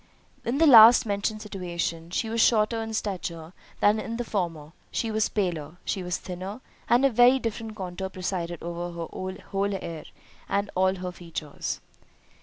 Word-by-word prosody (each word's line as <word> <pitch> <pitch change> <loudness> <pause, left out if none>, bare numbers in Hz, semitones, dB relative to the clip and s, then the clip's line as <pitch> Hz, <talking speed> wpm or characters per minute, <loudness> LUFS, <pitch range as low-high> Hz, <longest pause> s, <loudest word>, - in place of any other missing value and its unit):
In 245 +4 -1
the 325 - +5
last 235 -5 +9
mentioned 210 +1 -2
situation, 170 -4 -4
she 205 +5 -1
was 230 +1 0
shorter 225 0 +3
in 225 0 -5
stature 170 -5 -4 0.3
than 210 +1 +4
in 230 +2 -4
the 240 - -2
former—she 175 +1 -4
was 220 0 +1
paler—she 180 -1 -3
was 180 0 -2
thinner—and 205 +7 -2
a - - +6
very 245 +3 +6
different 225 -2 -4
contour 190 -1 -5
presided 180 -3 -4
over 170 0 -5
her 185 +3 -5
whole 200 0 0
air, 165 -3 -7 0.4
and 200 +1 0
all 190 +1 +2
her 180 -1 -5
features. 165 -4 -5
190 Hz, 150 wpm, -26 LUFS, 175-220 Hz, 0.4 s, last